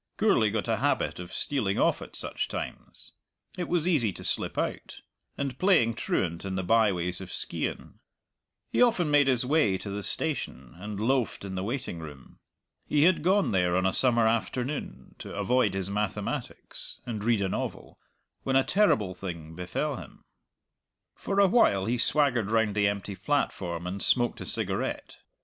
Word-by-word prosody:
Gourlay 200 - +3
got 110 +2 -2
a 115 -1 +1
habit 140 -4 0
of 90 0 -8
stealing 105 -9 0
off - - +2
at - - -9
such - - -2
times - - -7 0.4
it 180 -3 -3
was 175 -1 +1
easy 135 - +3
to - - -9
slip - - 0
out - - -3 0.4
and 135 -2 -3
playing 170 - +4
truant 85 -6 -2
in 95 -1 -3
the 95 - -1
byways 90 -4 +2
of 90 -1 -8
Skeighan. - - -4 0.7
He - - +2
often 185 -11 +3
made 145 -1 +5
his 125 -2 +3
way 135 -9 +3
to 100 - -7
the 100 +1 -3
station, 65 - -3
and 105 +1 -6
loafed 120 -2 0
in 95 - -6
the 95 - -3
waiting 120 -5 -4
room. 75 -5 -11 0.5
He 145 -1 +3
had 180 +1 +4
gone 190 +4 +2
there 90 -2 +2
on 95 - +1
a 95 - +2
summer 120 -3 +3
afternoon, 115 - -2
to - - -8
avoid 125 -6 +1
his 95 0 -2
mathematics 105 0 -3
and 110 -4 -4
read 115 -3 +2
a 95 - 0
novel, - - -5 0.4
when 135 - -1
a 135 - +5
terrible 115 - +2
thing 85 -4 -7
befell 90 - -3
him. 85 -9 -12 0.9
For 200 0 -2
a 200 - +7
while 140 - +3
he 120 +3 0
swaggered 125 -7 +2
round 110 -2 +2
the 100 0 +2
empty 100 0 -3
platform 90 - -1
and 95 +2 -4
smoked 120 -1 +1
a - - -6
cigarette. - - -3
110 Hz, 170 wpm, -28 LUFS, 95-140 Hz, 0.9 s, a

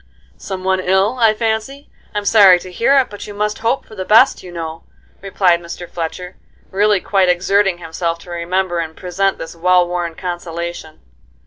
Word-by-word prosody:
"Some 190 -1 -7
one 190 0 +1
ill, 190 +6 +1
I 225 -2 +4
fancy? 225 +5 -3 0.2
I'm 205 0 -2
sorry 200 -4 +7
to 185 - -10
hear 255 +9 +2
it, 265 -5 +2
but 205 - -8
you 205 - -9
must 210 +1 -2
hope 230 +4 -1
for - - -16
the 190 -3 -5
best, 225 +7 +4
you 180 - -11
know," 165 -1 -6 0.4
replied 185 -3 +2
Mr. 175 +1 -8
Fletcher, 180 +2 -6 0.3
really 205 +1 +2
quite 190 -1 +1
exerting 190 +1 +2
himself 170 0 -3
to 175 - -12
remember 175 +1 -1
and 160 -1 -5
present 190 +2 -1
this 165 - -8
well 180 +1 +3
worn 175 -2 -3
consolation. 170 -2 -6
185 Hz, 180 wpm, -17 LUFS, 175-205 Hz, 0.4 s, sorry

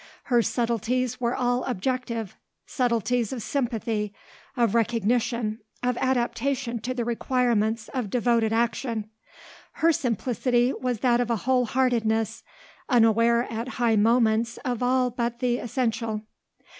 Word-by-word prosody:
Her 240 - +6
subtleties 240 +2 -1
were 240 0 0
all 245 0 0
objective, 235 -2 -2 0.3
subtleties 240 -2 0
of 245 -5 -4
sympathy, 225 -6 -2 0.4
of 235 -4 +2
recognition, 230 0 0 0.2
of 250 0 +1
adaptation 255 0 -1
to 255 +3 -4
the 240 -2 -2
requirements 230 -2 0
of 250 -6 -3
devoted 235 -1 +2
action; 225 -1 -1 0.6
her 330 +1 +3
simplicity 245 - +1
was 250 -4 -3
that 245 -1 +3
of 240 - -2
a 235 - +2
whole 255 -1 +3
heartedness 225 -3 +1 0.5
unaware 230 -1 +4
at 230 0 -5
high 235 -2 +3
moments 230 +1 +2
of 245 -2 -2
all 250 0 +2
but 235 0 -2
the 245 -1 0
essential. 230 -3 -2
235 Hz, 125 wpm, -25 LUFS, 225-250 Hz, 0.6 s, Her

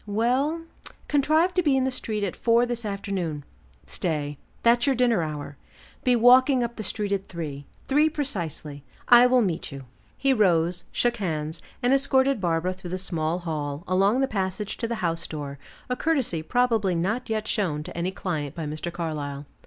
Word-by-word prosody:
"Well 255 +10 +1 0.4
contrive 310 +5 +3
to 360 - +2
be 290 -5 +3
in 260 - +2
the 265 - 0
street 220 -4 -3
at 195 - -2
four 235 +1 +3
this 240 -1 -4
afternoon. 190 -7 -3 0.4
Stay, 145 -4 -2 0.2
that's 235 +3 +4
your 275 - +3
dinner 240 -6 +3
hour; 150 -2 -5 0.5
be 250 -1 +4
walking 250 +2 +6
up 235 0 -3
the - - -5
street 210 0 -2
at 195 -1 -1
three, 145 -5 -6 0.2
three 300 +3 +4
precisely; 170 - -4 0.3
I 245 0 +9
will 250 -1 +4
meet 170 -5 -2
you." 135 -1 -8 0.3
He 275 -1 +3
rose, 175 -5 +2
shook 240 0 +1
hands, 160 -4 -3 0.2
and 245 +2 +4
escorted 270 -3 +3
Barbara 170 +1 0
through 180 -1 -9
the 185 - -2
small 170 -3 -1
hall, 150 -3 -4
along 195 +7 +3
the 270 - +2
passage 195 -1 -2
to 230 - -2
the 235 - -2
house 165 0 -1
door; 145 -3 -6 0.3
a 250 - -1
courtesy 260 - 0
probably 225 -1 +1
not 215 +9 -1
yet 215 -1 -1
shown 155 -8 -1
to - - -9
any 170 +2 -1
client 160 -7 -4
by 165 -2 -4
Mr. 155 +3 -4
Carlyle. 150 -4 -4
195 Hz, 180 wpm, -25 LUFS, 165-245 Hz, 0.5 s, I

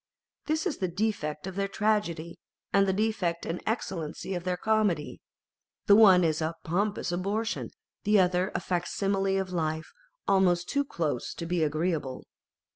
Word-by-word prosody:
This 310 0 0
is - - -1
the 185 - 0
defect 175 -5 -2
of 190 - -5
their 200 0 0
tragedy, 195 -6 -1 0.3
and 195 0 +4
the - - +3
defect 190 -4 -1
and 170 - -3
excellence 185 -8 -3
of 180 -2 -3
their 180 -1 0
comedy; 210 -8 0 0.6
the 200 - +7
one 195 -4 +7
is 160 -1 +1
a 160 +1 -1
pompous 200 +3 -1
abortion, 205 +6 -2 0.3
the 210 0 +4
other 180 +1 +2
a - - +2
fac 175 -1 -1
simile 195 -1 0
of 185 -1 -4
life, 160 -2 -2 0.4
almost 180 -3 +3
too 280 0 0
close 155 - -2
to 170 - -5
be 175 0 0
agreeable. 155 -3 -1
185 Hz, 160 wpm, -28 LUFS, 170-205 Hz, 0.6 s, the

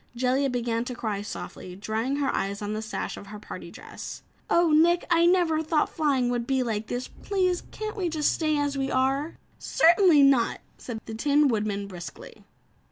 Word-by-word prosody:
Jellia 260 +3 +1
began 235 -2 -1
to 250 - -5
cry 215 -4 -3
softly, 185 -3 -7
drying 220 +7 -2
her 285 -2 0
eyes 200 +2 -2
on 205 +1 -3
the 215 - -3
sash 220 - -4
of 200 - -10
her 210 +1 -8
party 205 - -9
dress. - - -9 0.3
"Oh, 340 -1 +4
Nick, 340 +3 +4
I 335 0 +5
never 345 -3 +3
thought 315 -1 +1
flying 275 -6 +1
would 240 -1 -2
be 265 -1 +1
like 220 -2 -3
this. 245 +1 -3
Please 370 -3 -1
can't 430 0 -5
we 370 -5 -1
just 305 -2 +1
stay 310 -2 0
as 285 -1 0
we 270 -1 -1
are?" 270 +4 0 0.2
"Certainly 340 -3 +5
not," 270 -4 +3 0.2
said 225 -3 -7
the 225 - -7
Tin 290 +6 +3
Woodman 210 -3 -1
briskly. 175 -7 -10
265 Hz, 185 wpm, -26 LUFS, 220-315 Hz, 0.3 s, I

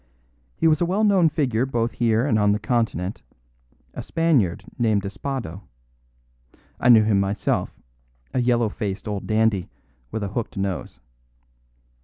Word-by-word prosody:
He - - +2
was 155 0 +3
a - - +3
well 195 +5 +1
known 195 -6 +4
figure 130 -7 0
both 120 -3 -1
here 115 0 +1
and 115 -7 +2
on 105 0 +3
the - - +1
Continent, 110 -4 -1 0.7
a - - -5
Spaniard 145 - +1
named 110 -4 +2
Espado; 100 -3 -5 1.2
I 125 - +2
knew 115 -3 +8
him 105 -2 +2
myself, 100 +1 -1 0.5
a 125 - +1
yellow 120 -2 +2
faced 100 0 -5
old 100 -2 -4
dandy, 110 -4 +1 0.4
with 110 - -4
a 100 - -3
hooked 110 +1 -4
nose. 95 -10 -3
110 Hz, 145 wpm, -23 LUFS, 100-130 Hz, 1.2 s, knew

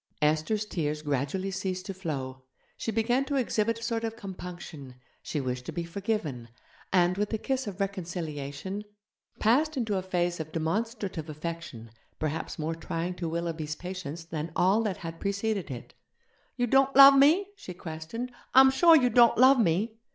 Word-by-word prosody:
Esther's 155 +8 +1
tears 155 -6 -3
gradually 145 +7 -1
ceased 185 -1 -3
to 195 - -4
flow, 135 -8 -5 0.3
she 225 - -3
began 235 +4 +1
to 280 +1 -3
exhibit 230 -3 +1
a 230 - -9
sort 230 -1 -1
of 225 0 -3
compunction, 175 - -8 0.3
she 150 - -3
wished 125 -2 -3
to - - -3
be 170 - -3
forgiven, 170 - -3 0.4
and, 180 0 +3
with 210 0 0
the 220 - -1
kiss 265 +2 -2
of 200 -1 -6
reconciliation, 175 -2 -4 0.5
passed 285 +8 +2
into 225 -5 0
a - - -3
phase 175 -2 -1
of 155 0 -5
demonstrative 175 0 -2
affection 155 -7 -6 0.3
perhaps 155 +1 -3
more 160 +1 -2
trying 165 +2 -3
to 175 -2 -4
Willoughby's 160 -2 -3
patience 175 -3 -6
than 165 0 -5
all 195 +5 +3
that 205 -6 -2
had 165 -1 -7
preceded 200 -1 -2
it. 125 -3 -8 0.6
'You 245 - +2
don't 270 +3 +3
love 275 0 +10
me?' 315 +9 +5
she 180 - -9
questioned, 170 +10 -6 0.2
'I'm 265 0 +9
sure 330 +5 +6
you 250 -5 +4
don't 235 +1 +6
love 260 +2 +7
me?' 220 +4 +1
185 Hz, 165 wpm, -28 LUFS, 160-225 Hz, 0.6 s, love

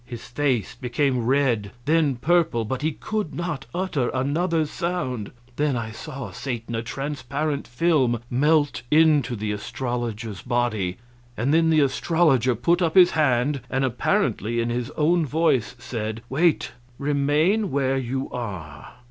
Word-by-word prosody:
His 120 -1 -9
face 130 -4 -1
became 125 0 -1
red, 125 -6 +2 0.2
then 155 -3 +3
purple, 155 -3 +2
but 130 +4 -3
he 155 +1 0
could 215 -4 -4
not 165 -7 -4
utter 175 -8 -1
another 160 +5 +1
sound. 145 - -3 0.3
Then 145 -3 +1
I 110 -1 -4
saw 135 +3 -7
Satan, 120 -3 -5
a 115 - -1
transparent 140 +3 -3
film, 130 -3 +2
melt 145 +4 +2
into 150 -5 +4
the 105 -1 -3
astrologer's 115 -1 -4
body; 120 -7 -1 0.4
then 155 +9 +2
the 155 -1 +4
astrologer 140 -4 +2
put 170 - +1
up 165 -1 +1
his 180 -2 +7
hand, 135 -2 +1
and 135 +1 +1
apparently 115 -2 0
in 115 0 0
his 120 +1 -2
own 165 +3 +3
voice 145 -6 +1
said, 115 -2 -5
"Wait 155 -2 +2 0.3
remain 150 +9 +1
where 135 -2 +1
you 130 +1 -3
are." 90 -11 -7
135 Hz, 140 wpm, -24 LUFS, 120-155 Hz, 0.4 s, his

